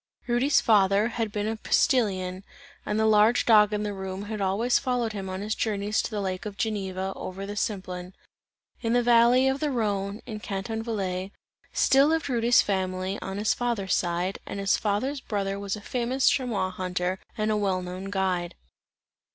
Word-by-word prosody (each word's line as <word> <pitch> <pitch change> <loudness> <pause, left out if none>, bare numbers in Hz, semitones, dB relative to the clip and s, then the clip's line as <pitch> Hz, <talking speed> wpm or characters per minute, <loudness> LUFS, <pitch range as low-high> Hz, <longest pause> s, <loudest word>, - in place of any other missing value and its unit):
Rudy's 250 +4 +3
father 205 0 +3
had 225 -2 -2
been 210 0 -2
a 220 - -1
postilion, 195 -9 +1 0.4
and 210 +1 0
the 220 - +3
large 220 +2 +4
dog 210 -2 +6
in 210 0 -1
the 205 -1 -2
room, 190 0 -5
had 210 0 -5
always 205 +6 +2
followed 245 -3 -1
him 195 -2 -5
on 185 +1 -4
his 215 +1 -2
journeys 210 -1 0
to - - -4
the 210 -2 -3
lake 190 +1 -3
of 200 -1 -8
Geneva, 195 -4 -2
over 190 +1 -6
the 205 +1 -6
Simplon. 185 -3 -4 0.7
In 230 -1 0
the 245 0 +3
valley 240 +2 +5
of 265 +1 0
the 300 - 0
Rhone, 205 -5 -1
in 215 -2 -6
Canton 210 +2 -4
Valais, 195 -4 -3 0.4
still 275 +2 +4
lived 320 -2 0
Rudy's 240 -1 +4
family, 190 0 -2
on 195 0 -5
his 210 +1 +2
father's 235 -6 -1
side, 175 +2 -1
and 200 - -5
his 195 0 +2
father's 255 +7 -1
brother 200 -3 -2
was 200 0 -3
a 210 - -9
famous 250 +4 0
chamois 245 -9 +1
hunter 185 0 -2 0.2
and 215 0 0
a - - +2
well 195 -3 0
known 180 +1 -6
guide. 190 -3 -1
205 Hz, 185 wpm, -26 LUFS, 190-230 Hz, 0.7 s, dog